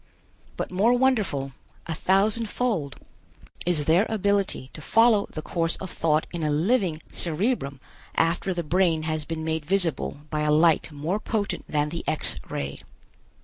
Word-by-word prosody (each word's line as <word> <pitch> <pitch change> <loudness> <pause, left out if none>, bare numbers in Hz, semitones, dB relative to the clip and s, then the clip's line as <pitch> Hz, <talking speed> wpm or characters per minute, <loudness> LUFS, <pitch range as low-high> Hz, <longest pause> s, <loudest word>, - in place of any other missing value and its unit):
But - - -3
more 205 +6 +3
wonderful, 215 - +1 0.3
a 165 - -3
thousand 205 +7 +2
fold, 200 - -1 0.7
is 160 -5 +2
their 175 +8 +4
ability 200 - 0
to 155 - -9
follow 225 +3 +4
the 155 - -6
course 165 -1 0
of 190 - -7
thought 155 -1 +1
in 170 - -3
a 155 - 0
living 165 +1 +1
cerebrum 165 - -1 0.4
after 170 +3 +1
the 175 -2 -2
brain 165 -1 +2
has 155 -1 -2
been 160 0 -4
made 160 -1 -1
visible 165 -4 0
by 155 - -1
a 150 0 +1
light 160 +1 +4
more 155 +8 -2
potent 215 -2 -2
than 150 -1 +1
the 170 +2 -5
X 155 - +1
ray. 70 0 -4
165 Hz, 155 wpm, -25 LUFS, 155-200 Hz, 0.7 s, their